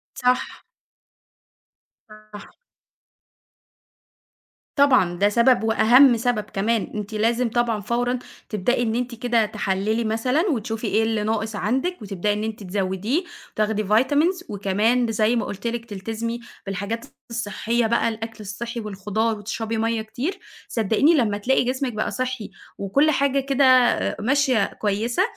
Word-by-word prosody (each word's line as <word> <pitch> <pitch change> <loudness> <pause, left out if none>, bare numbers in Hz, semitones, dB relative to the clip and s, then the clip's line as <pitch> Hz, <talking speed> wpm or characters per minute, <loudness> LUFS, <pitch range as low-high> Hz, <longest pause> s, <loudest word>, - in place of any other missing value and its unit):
صح. 250 +1 0 1.4
صح. 215 -1 -13 2.3
طبعًا، 255 - +4
ده 205 +1 +4
سبب 235 +2 +3
وأهَم 235 +3 +6
سبب 230 -2 0
كمان، 215 +2 -1
أنتِ 210 +1 -5
لازم 230 +3 +1
طبعًا 235 -2 0
فورًا 245 +4 -1 0.3
تبدئي 225 +4 0
إن 225 0 -1
أنتِ 245 0 -2
كده 230 -1 +1
تحلّلي 210 +1 -1
مثلًا 230 +8 +1
وتشوفي 225 -3 -3
إيه 220 - +2
اللي 220 -1 0
ناقص 220 0 -2
عندِك، 260 - -1
وتبدئي 205 0 -1
إن 210 - -3
أنتِ 220 -1 -5
تزوديه، 195 - -1 0.3
تاخدي 215 0 0
vitamins 290 - +2
وكمان 215 +4 +1
زي 220 +2 +2
ما 225 - 0
قُلت 205 +3 -5
لِك 235 0 -3
تلتزمي 225 +3 -4 0.3
بالحاجات 200 +4 -4 0.2
الصحّية 230 +1 -1
بقى 230 0 +2
الأكل 225 0 -6
الصحّي 230 +4 -5
والخضار 210 +1 -2
وتشربي 220 +2 -4
مَيّة 225 0 0
كتير، 250 - -4 0.3
صدقيني 225 - +2
لمّا 225 -9 +2
تلاقي 255 +6 +2
جسمِك 255 0 -2
بقى 215 - -2
صحّي 255 -3 -3 0.3
وكلّ 280 +11 +2
حاجة 275 0 +2
كده 275 0 +2 0.5
ماشية 255 -2 +2
كويسة، 220 - -1
225 Hz, 130 wpm, -23 LUFS, 210-245 Hz, 2.3 s, وأهَم